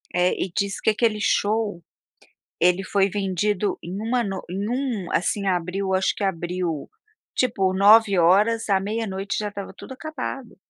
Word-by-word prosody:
É, 180 +1 +3
e 185 - -2
disse 200 0 -1
que - - +2
aquele 220 0 +1
show, 205 -5 0 0.8
ele 180 +2 +3
foi 195 +1 +2
vendido 200 +1 -1
em 175 +2 -6
uma 240 +3 0
noi 195 -2 -4
em 195 +3 -3
um 245 -7 -2
assim, 200 +3 0
abriu 190 +1 -1
acho 190 0 +1
que 205 - -2
abriu, 175 -4 -2 0.5
tipo, 195 -7 +1
9 200 +1 +6
horas 205 +7 +3
e - - +2
à 190 - +3
meia-noite 200 -1 -3
já 210 - -2
estava 200 -1 -7
tudo - - -10
acabado. 270 -3 -6
200 Hz, 165 wpm, -23 LUFS, 185-220 Hz, 0.8 s, 9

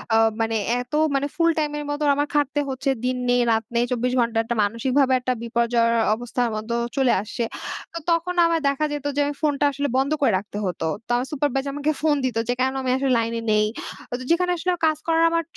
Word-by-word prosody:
আ - - +6 0.2
মানে 225 0 0 0.3
এত 250 +2 -12 0.2
মানে 275 +1 +1
ফুল 335 -1 +3
টাইম 300 -1 0
এর 295 - -4
মত 290 +1 -2 0.2
আমার 290 +1 0
খাটতে 290 0 +1
হচ্ছে 265 +1 -2 0.2
দিন 255 0 0
নেই, 245 0 +4
রাত 225 0 +2
নেই, 235 - +3
২৪ 250 +1 0
ঘন্টা, 235 -1 +1
একটা 235 +1 -3
মানসিকভাবে 260 +5 +1
একটা 255 0 -1
বিপর্যয়ের 235 0 +1 0.2
অবস্থার 245 +1 -2
মত 215 +2 -5 0.3
চলে 265 -3 +3
আসছে। 220 +3 -4 0.5
তো - - -5
তখন 335 +2 0
আমার 335 -1 +2
দেখা 280 +2 +1
যেত 290 -1 -5
যে, 290 - 0
আমি 290 - -3
ফোনটা 290 -1 +1
আসলে 285 +1 -2
বন্ধ 270 +2 +1
করে 265 -6 +4
রাখতে 205 +1 -7
হতো। 175 -3 -3 0.2
তো - - -51
আমার 250 +2 -1
সুপারভাইজার 275 -1 -1
আমাকে 290 +1 0
ফোন 310 -2 +3
দিত 245 -3 -1
যে, 245 - +2
কেন 260 +1 +1
আমি 260 - -2
আসলে 270 0 0
লাইনে 230 0 -1
নেই। 210 0 +3 0.7
যেখানে 360 +1 +2
আসলে 350 +2 0 0.2
কাজ 310 - +1
করার 330 0 +3
আমার 335 0 +1
265 Hz, 210 wpm, -23 LUFS, 235-290 Hz, 0.7 s, আ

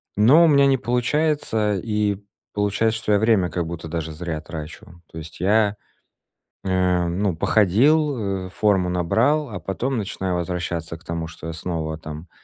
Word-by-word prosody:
но 125 +11 +6
у - - +5
меня 140 -2 +5
не 135 -1 +3
получается, 125 -3 0
и 105 0 -1 0.4
получается, 105 +2 0
что 105 - -2
я 100 - +4
время 105 -5 +3
как 85 +1 -2
будто 85 0 -6
даже 80 -1 -4
зря 80 -1 -4
трачу. 80 +1 -9
То - - -10
есть, 80 0 -9
я, 105 +1 +3 0.9
э, 90 -2 +1
ну, 95 +4 0
я 85 - -5
походил, 110 - +2
э, - - -8
форму 95 -2 +1
набрал, 115 - +1
а 95 -4 -6
потом 125 +7 -2
начинаю 95 -3 -3
возвращаться 85 -2 -3
к 80 - -21
тому, 85 -1 -4
что 85 -1 -10
я 80 - -4
снова 80 -2 -4
там 80 +2 -9
95 Hz, 170 wpm, -22 LUFS, 85-110 Hz, 0.9 s, но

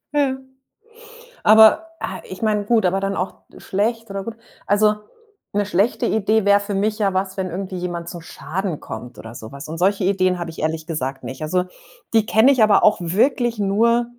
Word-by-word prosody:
Ja. 275 -2 +1 1.1
Aber, 220 +9 +6
ah, - - -5
ich 185 - -10
meine 210 -2 +1
gut, 220 -2 +2
aber 190 +2 +1
dann 195 0 -2
auch 180 +2 -4 0.2
schlecht 225 +3 -2
oder 195 0 -4
gut. 230 +1 -7 0.3
Also, 210 +1 +3 0.6
'ne 205 0 +1
schlechte 205 +3 +1
Idee 215 0 +1
wäre 200 0 +5
für 205 0 -5
mich 210 +2 -1
ja 195 -2 +1
was, 190 +1 -2
wenn 185 -1 -2
irgendwie 185 +2 -5
jemand 175 -1 -4
zum 175 - -8
Schaden 165 +2 -5
kommt 120 +2 -9
oder 115 +1 -10
so 110 +1 -9
was. 140 +1 -9
Und 160 - -6
solche 195 +2 +1
Ideen 185 -2 +1
habe 170 -1 -4
ich 160 - -12
ehrlich 160 +1 -2
gesagt 135 -4 -4
nicht. 130 +3 -7
Also, 180 +4 0 0.5
die 220 -2 +4
kenne 220 +5 +5
ich 245 -5 +3
aber 215 -1 +4
auch 210 - +4
wirklich 230 - +1
nur 230 +4 +2
195 Hz, 195 wpm, -21 LUFS, 175-215 Hz, 1.1 s, Aber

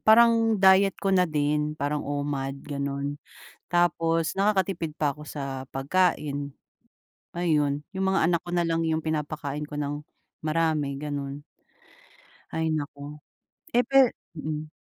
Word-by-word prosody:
parang 225 0 +5
diet 190 0 +6
ko 195 -1 0
na 180 -2 +4
din 150 0 0
parang 145 0 -1
OMAD 145 -1 -2
gano'n. 140 0 -3 0.5
Tapos 165 -1 +2
nakakatipid 190 -5 +1
pa 145 -2 -1
ako 150 - -10
sa 135 -3 -5
pagkain. 145 -1 0 0.8
Ayun, 150 -4 +1
yung 190 0 -2
mga 190 0 +2
anak 170 -1 +2
ko - - -5
na 175 - +3
lang 165 -1 0
yung 160 0 0
pinapakain 150 -1 -3
ko 150 - -9
ng 145 0 -3 0.4
marami 155 -3 +1
gano'n. 145 0 -5 1.1
Ay 160 0 -1
naku! 145 0 -5 0.6
Eh, 245 +1 +3
pe 270 -3 +6 0.2
mm. 155 0 -4
150 Hz, 130 wpm, -26 LUFS, 145-175 Hz, 1.1 s, diet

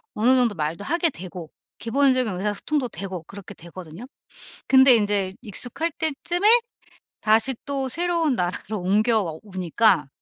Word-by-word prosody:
어느 245 +5 +3
정도 235 -5 +1
말도 160 +5 -3
하게 340 +2 +1
되고 175 - -9 0.3
기본적인 255 -2 +1
의사소통도 225 +7 -2
되고 190 -5 -7
그렇게 200 +2 -11
되거든요. 170 +4 -11 0.6
근데 265 -2 +7
인제 200 -3 -1
익숙할 260 - -3
때쯤에 345 +5 0 0.7
다시 225 +4 +2
또 275 -2 -2
새로운 335 -1 0
나라로 185 +3 -3
옮겨와 200 -3 +1
오니까 185 -4 +1
215 Hz, 310 characters per minute, -23 LUFS, 185-270 Hz, 0.7 s, 근데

